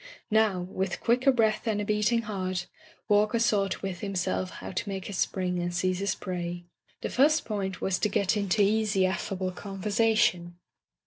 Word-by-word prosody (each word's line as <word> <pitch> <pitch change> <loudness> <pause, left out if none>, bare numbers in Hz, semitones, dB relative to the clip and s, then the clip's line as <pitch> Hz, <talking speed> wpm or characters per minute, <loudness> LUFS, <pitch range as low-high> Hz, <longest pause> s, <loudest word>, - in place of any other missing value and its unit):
Now, 215 -4 +3
with 185 +1 -3
quicker 250 +3 +3
breath 225 -2 +1
and 215 -2 +1
a 210 - -2
beating 210 +3 +1
heart. 185 -4 -3 0.4
Walker 210 +2 +3
sought 205 -5 +1
with 190 -3 -3
himself 185 -1 -2
how - - -8
to 190 +2 -3
make 195 -1 -4
his 200 - -5
spring 180 -2 0
and 175 0 -2
seize 185 +1 0
his 200 +1 0
prey. 175 -1 -4 0.4
The - - -3
first 300 +4 +3
point 195 -4 -3
was 190 -1 0
to 210 - +1
get 200 0 +1
into 200 0 +2
easy, 210 -2 +2
affable 185 0 -2
conversation. 195 -2 0
195 Hz, 170 wpm, -28 LUFS, 185-215 Hz, 0.4 s, Now